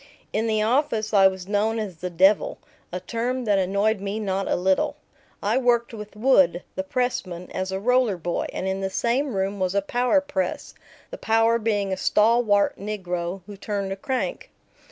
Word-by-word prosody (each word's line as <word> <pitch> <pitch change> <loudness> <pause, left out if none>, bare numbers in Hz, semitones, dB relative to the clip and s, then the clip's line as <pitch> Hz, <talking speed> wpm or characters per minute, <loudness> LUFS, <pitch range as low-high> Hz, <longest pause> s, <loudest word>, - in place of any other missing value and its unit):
In 220 +2 0
the 215 -1 +1
office 225 -3 0
I 195 -2 +7
was 190 -1 -4
known 215 +2 +1
as 205 -6 -4
the 180 +2 -4
"devil," 190 +4 +3 0.3
a 180 - -3
term 240 +6 -3
that 205 -2 +3
annoyed 200 +3 +1
me 200 +2 -3
not 195 -2 -2
a - - +1
little. 185 +1 +1 0.5
I - - +2
worked 240 -2 +1
with 210 -2 -9
Wood, 190 -7 +3
the 285 - -2
pressman, 245 -10 -3
as 185 0 -3
a 190 - -2
roller 245 -2 +2
boy, 175 0 -2
and 190 - -4
in 190 0 -2
the 190 - -1
same 245 +5 0
room 195 +1 -1
was 185 +1 -1
a 200 - +3
power 245 +7 +2
press, 285 0 -3 0.4
the - - -7
power 225 +1 +3
being 205 -3 0
a - - -3
stalwart 210 0 +3
negro 185 -3 -4
who 205 0 -9
turned 200 -1 -3
a - - -2
crank. 260 +6 -3
205 Hz, 185 wpm, -24 LUFS, 190-235 Hz, 0.5 s, I